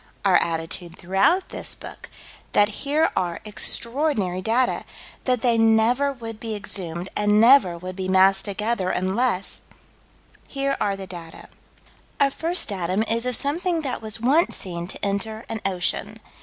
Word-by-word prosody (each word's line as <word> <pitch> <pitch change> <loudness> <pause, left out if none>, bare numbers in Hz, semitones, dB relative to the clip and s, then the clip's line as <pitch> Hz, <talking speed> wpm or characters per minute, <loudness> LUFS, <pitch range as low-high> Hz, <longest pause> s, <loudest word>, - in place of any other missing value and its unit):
Our 190 -2 +6
attitude 165 +1 -2
throughout 195 - +1
this - - -3
book: - - -11 0.4
That 205 0 +4 0.2
here 310 +2 +3
are 175 -3 -1
extraordinary 220 - 0
data 240 +5 +1 0.4
that 250 -3 +1
they 235 -2 +2
never 225 +5 +3
would 225 -4 -8
be 225 -1 -4
exhumed, 185 -3 -3
and 210 0 +3
never 230 -7 +6
would 185 +2 -7
be 190 -1 -4
massed 190 +1 +4
together, 210 -1 -1
unless 190 +2 -1 0.9
Here 275 0 -1
are 200 -1 +1
the 195 0 -7
data: 170 -3 -10 0.7
Our 280 -1 +3
first 335 +2 +1
datum 190 +1 -1
is 230 +2 0
of 250 - +3
something 330 +5 0
that 260 -5 -3
was 220 0 +3
once 280 +9 +3
seen 175 -2 -5
to 195 - -5
enter 215 +3 -3
an 225 -1 -4
ocean. 180 -2 -2
215 Hz, 150 wpm, -23 LUFS, 185-250 Hz, 0.9 s, Our